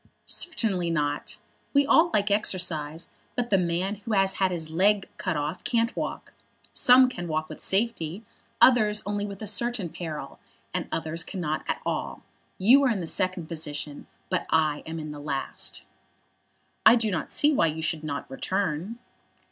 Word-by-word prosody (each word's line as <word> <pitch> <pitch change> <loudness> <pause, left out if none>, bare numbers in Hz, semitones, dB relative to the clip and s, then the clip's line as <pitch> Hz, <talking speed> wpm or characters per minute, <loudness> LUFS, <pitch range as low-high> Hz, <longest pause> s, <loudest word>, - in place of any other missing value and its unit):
"Certainly 195 - 0
not. 145 -3 -2 0.4
We 280 0 +5
all 325 +5 +5
like 205 -7 +1
exercise; 170 -6 0 0.3
but 240 -2 -2
the 195 - +5
man 180 +4 -1
who 210 +2 -5
has 195 -1 +3
had 190 - +4
his 165 -3 -3
leg 195 +4 +3
cut 185 -5 -2
off 150 +4 -3
can't 230 0 0
walk. - - -5 0.4
Some 255 +1 +7
can 175 -9 -5
walk 155 0 -1
with - - -9
safety; 195 -3 -1 0.4
others 215 -5 +5
only 205 0 -2
with 200 +1 -8
a - - -3
certain 215 -2 +1
peril; 155 -4 -7 0.3
and - - -2
others 165 0 -2
cannot 165 -6 -3
at - - -2
all. - - -3 0.3
You 240 +9 +6
are - - +4
in 220 -5 0
the 175 - -3
second 185 +1 0
position, 150 -2 -4 0.2
but 185 - -1
I 155 -2 +2
am 165 +1 -5
in 155 -1 -5
the 150 - -8
last." 140 -2 -3 1.0
"I 220 +2 +8
do 225 -3 0
not 180 - -3
see 300 +1 +3
why 165 - +3
you 160 +1 -3
should 160 -1 0
not 145 -2 -4
return." 185 - -2
185 Hz, 170 wpm, -26 LUFS, 155-210 Hz, 1.0 s, I